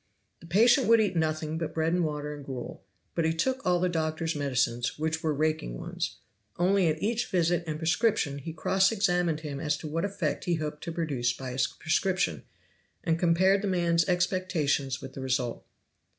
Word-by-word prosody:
The 165 - -14
patient 235 - +5
would 230 0 +6
eat 205 -4 +1
nothing 155 -1 -1
but 165 - -4
bread 160 +1 +1
and 180 0 +2
water 150 -1 -3
and 145 -1 -9
gruel; 130 -3 -7 0.3
but 170 - 0
he 160 0 +2
took 260 +10 0
all 180 -1 +2
the 180 - +2
doctor's 160 -1 -1
medicines, 125 -4 0
which 160 +1 -1
were 160 - 0
raking 155 - -1
ones; - - -4 0.4
only 185 +1 +3
at 155 0 0
each 235 +3 0
visit 175 -1 +1
and 155 -1 -2
prescription 160 -3 +1
he 160 +4 -6
cross 190 +5 +2
examined 180 -7 +1
him 145 -3 -5
as 150 0 0
to 155 - -7
what 165 +3 -2
effect 195 -7 -2
he 175 - +1
hoped 150 -1 -4
to 170 - -3
produce 140 -8 -1
by 130 -1 -6
his 125 0 +1
prescription, 180 +4 0 0.6
and 165 -1 +1
compared 185 +3 +4
the 205 - -2
man's 170 -2 +2
expectations 175 -7 0
with 135 - -8
the 135 - -7
result. 130 -2 -1
160 Hz, 190 wpm, -28 LUFS, 150-180 Hz, 0.6 s, would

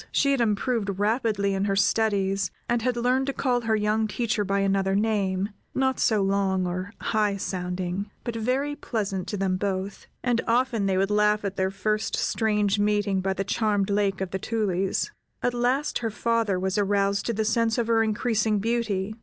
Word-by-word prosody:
She 280 - +2
had 275 -3 +2
improved 210 -2 0
rapidly 210 -2 +1
in 195 +1 0
her 200 -1 +1
studies, 200 -1 +1 0.2
and 240 -1 +1
had 250 +1 0
learned 255 +3 +1
to 275 - -1
call 250 -3 0
her 225 -1 +1
young 215 +1 +1
teacher 215 +1 -1
by 200 0 0
another 195 0 +1
name, 200 -2 0 0.3
not 265 -1 +1
so 215 -3 +3
long 195 -1 +1
or 185 +3 -3
high 210 -2 0
sounding, 180 +1 -3
but 235 -2 -4
very 260 +6 -1
pleasant 200 - -3
to 205 - -3
them 190 -1 0
both, 195 0 -3 0.2
and 240 -2 +1
often 235 -3 +1
they 190 -1 +1
would 195 +2 +1
laugh 210 0 +2
at 200 -1 -3
their 190 -1 +1
first 215 +3 -1
strange 210 -2 +1
meeting 205 -2 +1
by 190 0 0
the 195 - -2
charmed 205 -1 0
Lake 200 -1 +1
of 190 - -3
the 190 - -2
Tulies. 195 - -1 0.3
At 245 - +1
last 250 +4 0
her 230 - -2
father 225 -3 0
was 190 +2 0
aroused 200 0 +1
to 235 - 0
the 220 0 -1
sense 225 0 +1
of 235 - +1
her 225 0 +3
increasing 220 -1 +1
beauty. 215 -2 -1
210 Hz, 185 wpm, -26 LUFS, 195-230 Hz, 0.3 s, so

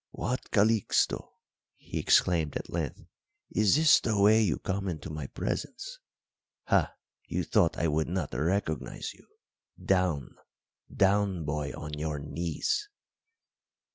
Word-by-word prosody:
"What, 125 +2 -3
Calixto," 110 0 +2 0.4
he - - -5
exclaimed 80 -5 +3
at - - -8
length, - - -3 0.5
"is 110 0 +3
this 155 +1 +6
the 110 -3 -1
way 105 +2 +6
you 90 -9 +1
come 95 0 -3
into 80 -4 -5
my 75 -3 -5
presence? - - -4 0.6
Ha, - - +1 0.3
you - - -1
thought 85 - +2
I 85 - +1
would 80 0 0
not 85 -7 -3
recognise 80 +4 -2
you! - - -22 0.5
Down 90 -7 0 0.5
down, 95 -3 +2
boy, 75 0 -2
on 75 -1 -7
your 75 -1 -2
knees!" 85 - -2
90 Hz, 125 wpm, -29 LUFS, 75-105 Hz, 0.6 s, this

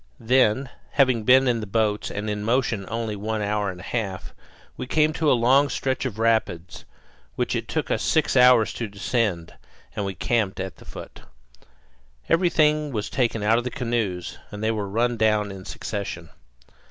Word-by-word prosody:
Then, 125 +1 +2 0.2
having 130 -6 +3
been 130 +2 +6
in 120 -2 +2
the 105 - -6
boats 105 0 0
and 105 +1 -4
in 105 -1 -3
motion 115 -4 0
only 115 -1 -3
one 110 +1 -3
hour 105 0 -1
and 90 -1 -7
a - - -10
half, 100 -6 -4 0.4
we - - -6
came 155 +2 +2
to 155 -1 +2
a 125 - +4
long 135 +5 +4
stretch 130 0 -2
of 115 -5 -4
rapids 110 -7 -1 0.5
which - - -1
it - - -3
took - - -2
us - - 0
six 160 -3 +1
hours 125 -3 +6
to 115 - -4
descend, 100 -4 -2 0.4
and 105 - -2
we 95 -1 -4
camped 105 +2 0
at 95 -1 -5
the - - -16
foot. - - -10 1.1
Everything 155 -4 +2
was 105 -4 -3
taken 115 -5 0
out 110 +2 +3
of - - -4
the 125 - -3
canoes, 115 -9 -3
and 105 +1 -7
they 110 - +2
were 105 -3 -3
run 120 +3 0
down 105 -2 +2
in 95 -1 -9
succession. 95 -6 -5
110 Hz, 180 wpm, -24 LUFS, 105-125 Hz, 1.1 s, been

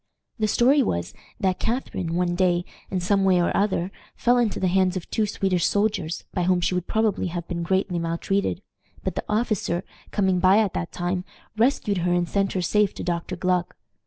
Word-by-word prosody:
The 215 - +2
story 255 +7 +4
was, 85 - -1 0.3
that 185 -2 0
Catharine 205 -8 -2
one 175 0 +1
day, 175 -1 +2 0.2
in 190 - -1
some 195 +2 +2
way 185 -2 +4
or 175 - +1
other, 195 -2 +1 0.2
fell 245 +1 +3
into 230 -4 0
the - - 0
hands 185 0 +2
of 175 - -6
two 215 -1 +1
Swedish 190 -4 +1
soldiers, 200 -5 0
by 180 - 0
whom 180 0 +3
she 175 +1 0
would 180 -1 -2
probably 220 -4 +1
have 170 -1 -5
been 170 -1 -3
greatly 185 0 0
maltreated; 175 +4 -1 0.4
but 190 - -2
the - - -3
officer, 210 -5 0 0.3
coming 190 -3 +1
by 185 +2 +5
at 215 -4 +2
that 170 - -3
time, 180 +1 -2 0.3
rescued 220 -4 +1
her 175 +1 +1
and 175 -1 +1
sent 195 +1 0
her 185 - -1
safe 210 +3 +2
to - - -5
Dr. 175 +1 -2
Gluck. 180 0 0
185 Hz, 195 wpm, -24 LUFS, 175-205 Hz, 0.4 s, by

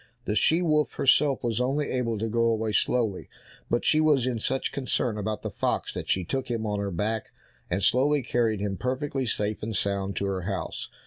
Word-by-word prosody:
The 105 - -1
she 165 +9 +3
wolf 150 -3 +2
herself 135 0 +3
was 120 0 0
only 140 +4 0
able 120 -3 -1
to 110 +2 -2
go 115 +1 +1
away 110 -1 0
slowly, 110 -3 0 0.4
but 120 - 0
she 155 - +4
was 145 -5 +3
in 125 -3 -1
such 130 +4 -1
concern 125 -4 0
about 105 0 -3
the - - -3
fox - - -1
that - - -6
she 95 - +2
took 130 +6 -3
him 115 -2 -2
on 105 -1 -1
her 100 0 -2
back, 105 +5 -2 0.4
and 95 +2 -1
slowly 140 +6 +3
carried 115 -4 0
him 100 -2 -2
perfectly 130 +2 -2
safe 105 -1 -1
and 110 0 -3
sound 100 0 -1
to 100 - -1
her 95 -1 -1
house. 95 +1 -4
115 Hz, 205 wpm, -27 LUFS, 105-130 Hz, 0.4 s, she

